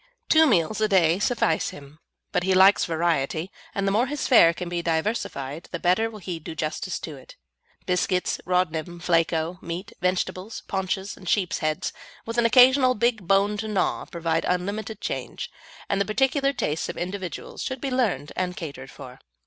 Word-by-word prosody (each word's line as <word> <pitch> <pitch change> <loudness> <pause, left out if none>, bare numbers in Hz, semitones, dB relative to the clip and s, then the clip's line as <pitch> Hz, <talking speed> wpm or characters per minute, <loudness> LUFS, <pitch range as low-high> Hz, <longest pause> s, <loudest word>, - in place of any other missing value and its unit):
Two 320 0 +6
meals 215 - +2
a 215 - +4
day 180 -3 +3
suffice 210 -7 +1
him, 145 +1 -12 0.3
but - - +1
he 190 +1 +2
likes 190 +2 +6
variety, 165 0 -1 0.2
and 200 - 0
the - - +2
more 230 +6 +2
his 295 +2 -3
fare 195 -10 +7
can 175 +1 -6
be 175 0 -2
diversified 160 - -2
the 170 - -2
better 185 +7 +2
will 220 - -10
he 180 -4 -5
do 160 +1 -8
justice 155 -1 -3
to - - -7
it. - - -14 0.5
Biscuits, 180 0 0
Rodnim, 175 -1 -1
Flako, 165 0 +1
meat, 175 +3 -6
vegetables, 185 +3 -2
paunches, 190 +1 -2
and 185 -2 -8
sheep's 190 -4 +1
heads, 155 0 -1 0.3
with 230 +1 -2
an 235 - +5
occasional 255 +1 +6
big 225 -4 0
bone 200 +2 +3
to 220 +1 -4
gnaw, 210 -3 0
provide 165 -1 -1
unlimited 200 +4 -2
change, - - -4 0.4
and 200 0 0
the - - +2
particular 270 +6 +2
tastes 160 - -2
of - - -5
individuals 185 0 -5
should 260 -1 -3
be 270 0 -3
learned 230 - 0
and 180 0 -2
catered 140 -6 -7
for. 125 +1 -11
185 Hz, 175 wpm, -25 LUFS, 165-215 Hz, 0.5 s, fare